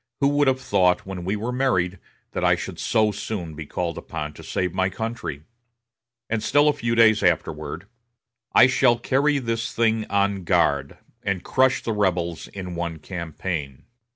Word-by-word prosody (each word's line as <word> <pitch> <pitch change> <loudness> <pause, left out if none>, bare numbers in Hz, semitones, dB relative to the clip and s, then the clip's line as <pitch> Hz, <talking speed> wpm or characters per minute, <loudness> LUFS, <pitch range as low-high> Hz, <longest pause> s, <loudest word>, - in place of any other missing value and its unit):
Who 140 - +3
would 145 0 +2
have 130 -1 +2
thought, 90 -8 +2
when 95 -2 -6
we 95 +4 -1
were 110 +4 -3
married, 100 -9 0 0.3
that - - -3
I - - +5
should - - -7
so 110 -2 +2
soon 100 -5 -5
be 75 -1 -8
called 85 0 -3
upon 75 0 -6
to - - -12
save 90 -2 -2
my 95 0 +1
country?" 95 -8 -5 0.8
And 115 -1 -1
still 145 +5 +3
a 150 - +4
few 115 -5 -1
days 110 -2 +5
afterward: 90 +4 -1 0.7
"I - - +7
shall 125 -2 +4
carry 140 +5 +2
this 115 -3 -2
thing 110 -1 +2
en 100 -1 +1
grande, 70 -4 +1 0.2
and 100 -2 -2
crush 130 0 +2
the 115 - -1
rebels 90 -5 -1
in 90 -2 -7
one 85 -1 -3
campaign." 80 -5 -5
100 Hz, 170 wpm, -24 LUFS, 85-115 Hz, 0.8 s, I